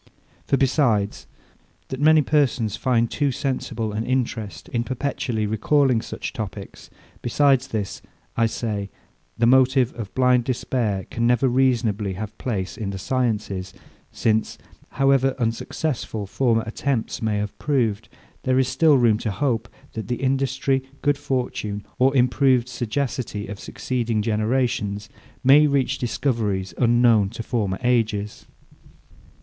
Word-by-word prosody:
For, 135 - +2
besides, 125 -7 +1 0.6
that 130 - -5
many 155 0 +6
persons 130 -8 +1
find 120 +1 +1
too 145 -2 +1
sensible 120 -5 -3
an 110 +2 -2
interest 120 -4 -2
in 120 -1 -1
perpetually 125 -3 -2
recalling 120 +3 +2
such - - -6
topics; 100 -2 -7 0.3
besides 135 +1 +3
this, 105 -3 -4 0.3
I 115 - +3
say, 105 -3 -3 0.5
the 115 - +3
motive 130 0 +4
of 110 -5 -7
blind 125 -2 +3
despair 115 -6 -1
can 115 0 0
never 125 +2 +3
reasonably 120 -6 +1
have 105 +3 -6
place 95 -7 -3
in 105 -3 -3
the 100 - -4
sciences; 105 -4 -2 0.4
since, 110 -1 0 0.4
however 135 -1 +3
unsuccessful 115 -1 -2
former 115 +2 +1
attempts 115 +1 -2
may 110 -2 0
have 105 0 -3
proved, 115 -7 0 0.3
there 130 0 +1
is 130 -1 +3
still 150 +2 +4
room 115 -4 +3
to 110 - -2
hope, 120 +2 -1 0.2
that 110 -3 -5
the 120 - -1
industry, 135 +1 0 0.2
good 145 -1 +2
fortune, 125 -7 -3
or 135 +2 +4
improved 125 0 +3
sagacity 120 -3 -3
of 100 0 -7
succeeding 115 -2 -2
generations 110 -1 -1 0.3
may 145 +3 +7
reach 140 -2 0
discoveries 110 -6 -1
unknown 120 -4 +4
to 115 +2 -7
former 105 -5 -1
ages. 110 -4 0
120 Hz, 130 wpm, -23 LUFS, 105-130 Hz, 0.6 s, may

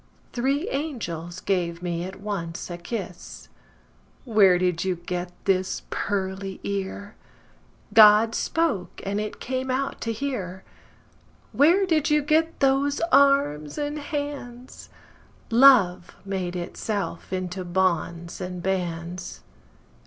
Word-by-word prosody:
Three 275 +6 0
angels 185 - -4
gave 175 -3 -1
me 170 -1 -2
at 190 +1 -8
once 180 -5 -5
a 175 - -5
kiss. 180 -2 -7 0.8
Where 205 -6 +5
did 180 -2 0
you 185 -1 0
get 175 +1 -5
this 185 -1 0
pearly 190 -1 -3
ear? 200 +1 -4 0.8
God 220 0 +7
spoke, 290 - -1
and 200 +2 -1
it 215 - -6
came 260 +1 -3
out 265 +2 -2
to 230 - -2
hear. 210 -7 -4 0.9
Where 345 +8 +4
did 320 -5 +1
you 300 -1 +3
get 320 +3 +1
those 275 +1 +2
arms 275 - +3
and 295 0 -2
hands? 285 -5 -6 0.6
Love 225 -8 +5
made 185 -2 -3
itself 200 +3 -4
into 185 0 -3
bonds 175 -1 -1
and 180 -1 -5
bands. 180 -1 -3
195 Hz, 115 wpm, -25 LUFS, 180-270 Hz, 0.9 s, God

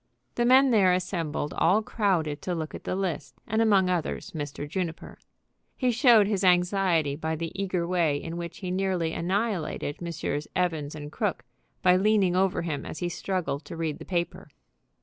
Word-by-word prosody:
The 240 - 0
men 260 +2 +6
there 195 -5 +5
assembled 170 -5 -2
all 200 +6 +3
crowded 175 -10 0
to 180 - -2
look 160 -2 -4
at - - -9
the - - -1
list, 185 -5 -3
and 220 +1 0
among 200 -4 +4
others 180 +2 -2
Mr. 145 -3 -5
Juniper. 170 0 -5 0.6
He 255 -2 +2
showed 235 -3 +6
his 200 -1 -1
anxiety 180 -4 +3
by 160 +1 -2
the 165 +1 -4
eager 185 -3 -2
way 170 -5 +1
in 165 +3 -6
which 170 -1 -6
he 180 -2 -3
nearly 185 -3 0
annihilated 185 -5 -2
Messrs. 160 -3 -3
Evans 160 -5 -1
& 145 - -9
Crooke, 205 +3 -2 0.4
by 180 0 +6
leaning 195 -2 +3
over 185 -2 +1
him 155 -4 -3
as - - -7
he 175 - -2
struggled 175 -5 -3
to 165 - -8
read 160 -2 -2
the - - -8
paper. 175 -2 -3
180 Hz, 175 wpm, -27 LUFS, 160-195 Hz, 0.6 s, men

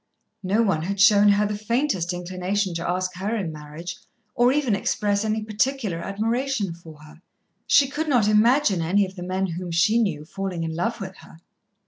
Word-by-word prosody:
No 200 +4 +1
one 190 -8 +1
had 195 +4 -3
shown 205 0 +6
her 205 +1 +3
the 210 0 -2
faintest 215 - -1
inclination 185 +2 -2
to 170 +1 -3
ask 185 +1 -1
her 205 +5 -2
in 190 -7 -3
marriage, 155 +3 -8 0.4
or 245 +1 +3
even 270 -5 +1
express 205 +1 0
any 220 0 -1
particular 215 -3 -1
admiration 225 +1 -2
for 160 -3 -14
her. 155 +2 -16 0.5
She 280 -2 +5
could 305 +3 -3
not 240 -7 +3
imagine 215 - +3
any 195 +5 +2
of 190 0 -10
the 180 - -8
men 185 +2 -1
whom 180 0 -5
she 200 +7 +3
knew 160 -10 -1
falling 185 -1 -4
in 160 -1 -4
love 225 +8 -2
with 190 -2 -7
her. - - -15
195 Hz, 185 wpm, -24 LUFS, 175-220 Hz, 0.5 s, shown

